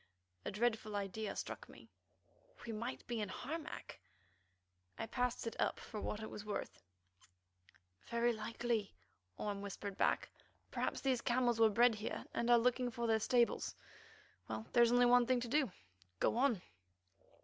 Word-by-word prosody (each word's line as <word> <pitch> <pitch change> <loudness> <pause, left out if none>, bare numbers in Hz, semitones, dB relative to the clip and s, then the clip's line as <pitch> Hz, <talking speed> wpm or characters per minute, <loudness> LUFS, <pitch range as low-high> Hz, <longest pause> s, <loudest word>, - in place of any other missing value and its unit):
A - - -1
dreadful 220 0 0
idea 205 +1 -3
struck - - -5
me: - - -14 0.8
we 235 - -4
might 235 +4 -4
be 235 -2 -2
in 205 - -2
Harmac! 295 - -6 1.0
I - - -2
passed 250 +1 -1
it 230 - -3
up - - +1
for 215 - -6
what 215 +1 -3
it 220 - -5
was 210 - -6
worth. 210 -1 -4 1.3
"Very 235 +1 +2
likely," 225 -1 -2 0.4
whispered 200 -1 -3
Orme 195 - -11
back. - - +2 0.4
"Perhaps - - -1
these 260 -3 +1
camels 240 -1 +2
were 225 -1 +7
bred 235 +3 +5
here, 215 +1 -4
and 235 - 0
are 240 - +8
looking 250 +1 +2
for 235 0 -3
their 225 -1 +3
stables. 235 +2 +2 0.7
Well, 110 0 -4
there 240 - +6
is 235 0 +6
only 245 0 +6
one 245 0 +6
thing 255 -1 +3
to 240 - -3
do—go 95 - -1
on." 240 -6 +2
230 Hz, 155 wpm, -37 LUFS, 210-245 Hz, 1.3 s, are